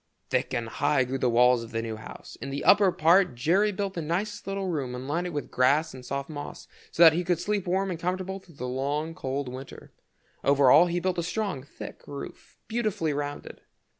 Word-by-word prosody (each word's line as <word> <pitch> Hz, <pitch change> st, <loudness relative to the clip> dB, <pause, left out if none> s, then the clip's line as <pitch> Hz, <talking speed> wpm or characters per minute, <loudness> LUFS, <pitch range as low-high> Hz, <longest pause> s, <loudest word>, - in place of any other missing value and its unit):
Thick -, -, 0 dB
and 115 Hz, -1 st, -2 dB
high 145 Hz, +3 st, +1 dB
grew 130 Hz, +2 st, -3 dB
the 125 Hz, -, +2 dB
walls 125 Hz, +1 st, +4 dB
of 115 Hz, -, -9 dB
the 115 Hz, 0 st, -2 dB
new 115 Hz, -1 st, -4 dB
house. 110 Hz, -, -10 dB
In 140 Hz, -, -5 dB
the 140 Hz, +1 st, -4 dB
upper 200 Hz, -2 st, +6 dB
part 170 Hz, -2 st, +4 dB
Jerry 185 Hz, -, +2 dB
built 200 Hz, -1 st, -3 dB
the 170 Hz, -, -3 dB
nicest 180 Hz, +8 st, -3 dB
little 195 Hz, 0 st, -2 dB
room, 140 Hz, -8 st, -2 dB
and 125 Hz, +1 st, -6 dB
lined 170 Hz, +5 st, -1 dB
it -, -, -4 dB
with 145 Hz, -5 st, -5 dB
grass 140 Hz, +5 st, +2 dB
and 130 Hz, -1 st, -10 dB
soft 140 Hz, +2 st, -4 dB
moss, 145 Hz, -2 st, -8 dB, 0.2 s
so 170 Hz, -, +5 dB
that 160 Hz, -1 st, +9 dB
he 175 Hz, +3 st, 0 dB
could 175 Hz, -1 st, 0 dB
sleep 205 Hz, 0 st, -1 dB
warm 190 Hz, +2 st, 0 dB
and 170 Hz, -, -4 dB
comfortable 185 Hz, +2 st, -3 dB
through 175 Hz, -4 st, -19 dB
the 125 Hz, -1 st, -5 dB
long 145 Hz, +5 st, -2 dB
cold 135 Hz, -2 st, -3 dB
winter. 130 Hz, +2 st, -9 dB, 0.5 s
Over 140 Hz, -2 st, +5 dB
all 175 Hz, -, +7 dB
he 175 Hz, 0 st, -1 dB
built 180 Hz, 0 st, -1 dB
a -, -, +1 dB
strong, 185 Hz, -4 st, -2 dB
thick 140 Hz, -, -10 dB
roof 140 Hz, -, -9 dB
beautifully 215 Hz, -9 st, -1 dB
rounded. 145 Hz, 0 st, -5 dB
155 Hz, 220 wpm, -27 LUFS, 135-185 Hz, 0.5 s, that